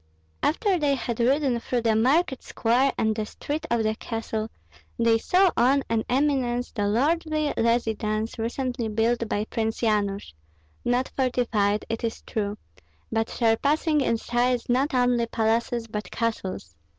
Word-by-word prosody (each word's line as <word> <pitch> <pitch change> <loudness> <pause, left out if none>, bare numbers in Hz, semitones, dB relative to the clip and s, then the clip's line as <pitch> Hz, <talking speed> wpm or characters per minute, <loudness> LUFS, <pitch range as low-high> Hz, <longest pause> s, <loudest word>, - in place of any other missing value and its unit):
After 370 +3 +1
they 285 -2 +2
had 240 -2 -4
ridden 260 0 +2
through 240 +1 -1
the 225 -2 +3
market 265 +5 +2
square 250 +4 +1
and 220 -1 +1
the 215 - -1
street 310 +7 -5
of 235 -1 +1
the 215 0 +1
castle, 220 -1 -4 0.5
they 230 -1 +3
saw 370 +7 +3
on 265 +4 +3
an 225 -1 +1
eminence 255 -3 +1
the 205 -3 -1
lordly 305 +6 +1
residence 225 -1 0
recently 245 +1 -2
built 225 +1 0
by 210 +1 -1
Prince 220 0 -2
Yanush, 205 - 0 0.5
not 245 +2 0
fortified, 230 -6 +1
it 225 0 -4
is 230 -1 -3
true, 205 -1 -3 0.5
but 225 0 0
surpassing 290 +7 +2
in 230 -3 +1
size 245 +1 0
not 265 +4 +1
only 245 -2 +2
palaces 230 +1 0
but 210 -3 -5
castles. 190 - -3
235 Hz, 145 wpm, -25 LUFS, 220-265 Hz, 0.5 s, the